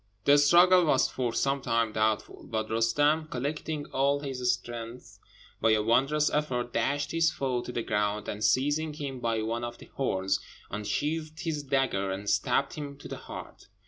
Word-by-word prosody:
The 145 +1 +6
struggle 175 +4 +6
was 135 -3 +3
for 125 -2 -2
some 135 +3 0
time 115 -2 +1
doubtful; 110 0 -1
but 110 -1 -2
Roostem, 145 +8 +2
collecting 145 +3 -3
all 140 +2 +2
his 125 -3 0
strength, 120 +1 -7 0.4
by 115 - +4
a 105 -1 +2
wondrous 135 +7 +2
effort 125 -5 -1
dashed 145 +5 0
his 165 0 +3
foe 130 -3 -1
to 125 - -7
the 120 - -2
ground, 105 -1 -1
and 105 +1 -4
seizing 145 +5 +2
him 140 -3 -5
by 115 -2 -1
one 115 +2 -2
of 120 0 -5
the - - -15
horns, 95 -7 0 0.3
unsheathed 155 - -2
his 160 -4 -2
dagger 135 -8 0
and 100 +2 -2
stabbed 135 +7 +1
him 145 -2 -6
to - - -10
the - - -6
heart. - - -10
130 Hz, 175 wpm, -28 LUFS, 115-145 Hz, 0.4 s, The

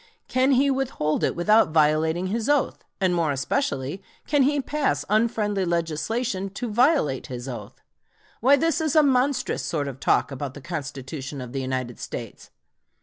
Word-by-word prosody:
Can 260 +2 +3
he 275 +2 +3
withhold 260 - -1
it - - +1
without 210 +5 +4
violating 160 +2 +2
his 220 +6 -2
oath? 290 -3 +1 0.2
and 185 -2 +2
more 165 -4 +1
especially, 140 - -2 0.2
can 290 -1 +2
he 285 +2 +3
pass 270 - -1
unfriendly 215 -2 +1
legislation 185 +5 -1
to 235 -2 -4
violate 240 - +2
his 125 0 -6
oath? 125 -3 -8 0.6
Why 265 +5 +6
this 330 +4 +1
is 315 -2 0
a 310 - +7
monstrous 260 -1 +1
sort 145 -4 -2
of 135 -1 -7
talk - - +2
about 135 0 -5
the - - -8
Constitution 140 -3 -6
of 125 -2 -7
the 135 - -2
United 130 -2 -3
States! - - -7
185 Hz, 160 wpm, -24 LUFS, -, 0.6 s, a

